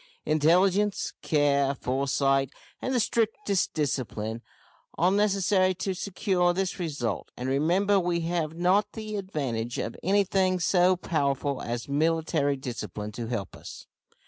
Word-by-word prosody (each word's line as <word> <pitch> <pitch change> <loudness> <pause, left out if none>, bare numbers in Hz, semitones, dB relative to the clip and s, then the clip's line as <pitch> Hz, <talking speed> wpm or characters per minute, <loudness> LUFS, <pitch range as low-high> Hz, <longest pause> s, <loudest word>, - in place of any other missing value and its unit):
Intelligence, 185 +6 +2
care, 140 -2 +2
foresight, 135 +1 +1 0.3
and 260 - -2
the 255 - +2
strictest 220 -2 0
discipline, 115 -7 -2 0.6
are 180 +3 +3
necessary 195 -2 +2
to 190 +2 -2
secure 185 -1 0
this 190 +1 -2
result; 140 - -3
and, 125 - -4
remember, 175 +9 +2
we 175 -1 0
have 165 -2 -2
not 180 +4 +2
the 215 -1 -5
advantage 130 - -3
of 115 - -3
anything 190 -1 +2
so 180 +1 +3
powerful 140 -5 -1
as 120 0 -4
military 155 0 +1
discipline 105 -5 -5
to 115 +2 -5
help 110 -6 -4
us. - - -10
165 Hz, 125 wpm, -27 LUFS, 135-190 Hz, 0.6 s, are